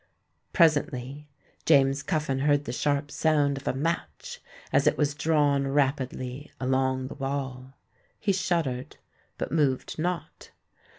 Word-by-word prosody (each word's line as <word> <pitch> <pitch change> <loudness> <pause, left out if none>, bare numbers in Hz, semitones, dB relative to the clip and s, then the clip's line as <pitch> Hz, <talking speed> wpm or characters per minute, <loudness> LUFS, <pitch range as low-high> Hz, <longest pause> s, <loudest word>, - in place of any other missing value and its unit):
Presently 145 -4 +1 0.3
James 140 -2 +4
Cuffin 145 -3 -1
heard 145 +1 +2
the - - -3
sharp 145 +2 0
sound 145 -1 +2
of 135 - -9
a - - +2
match 135 - -3 0.3
as - - +4
it - - +3
was 145 -1 +1
drawn 145 -2 +2
rapidly 135 0 -1
along 130 0 0
the - - -7
wall. 135 -2 -4 0.4
He 200 -2 +1
shuddered—but 170 -10 -4
moved 145 -2 0
not. 170 -2 -4
140 Hz, 120 wpm, -27 LUFS, 130-150 Hz, 0.4 s, James